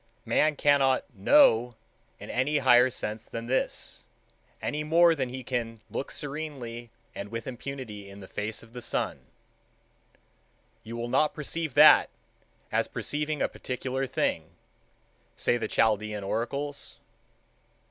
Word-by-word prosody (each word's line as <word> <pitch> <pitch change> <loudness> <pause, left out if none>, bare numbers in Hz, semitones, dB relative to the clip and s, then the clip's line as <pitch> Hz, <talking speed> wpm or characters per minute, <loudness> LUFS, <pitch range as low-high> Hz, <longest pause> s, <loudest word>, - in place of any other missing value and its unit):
Man 155 0 +2
cannot 140 -2 +3
know 120 - +5 0.4
in - - -8
any 140 +4 +1
higher 130 -2 +6
sense 110 -2 -5
than 115 0 -6
this, 130 +2 -2 0.6
any 150 +1 -2
more 165 +2 +5
than 130 -5 -2
he 130 +1 -6
can 115 -2 -3
look - - -3
serenely 135 -6 -5 0.2
and 100 - -6
with 115 0 -5
impunity 120 -5 -7
in 100 +1 -11
the 95 - -10
face 105 +4 -4
of 115 0 -17
the 125 - -7
sun:?? - - -1
t?????,?? - - -27
?e???? - - -29
???se??,—"You 115 +1 -18
will 120 0 -3
not 150 +5 +2
perceive 155 -1 -3
that, 150 +1 +8 0.6
as - - +1
perceiving 150 0 -2
a - - +2
particular 130 +1 -4
thing," - - -2 0.8
say - - +2
the 120 - -3
Chaldean 105 -1 +1
Oracles. 140 +8 -3
125 Hz, 135 wpm, -28 LUFS, 115-145 Hz, 0.8 s, that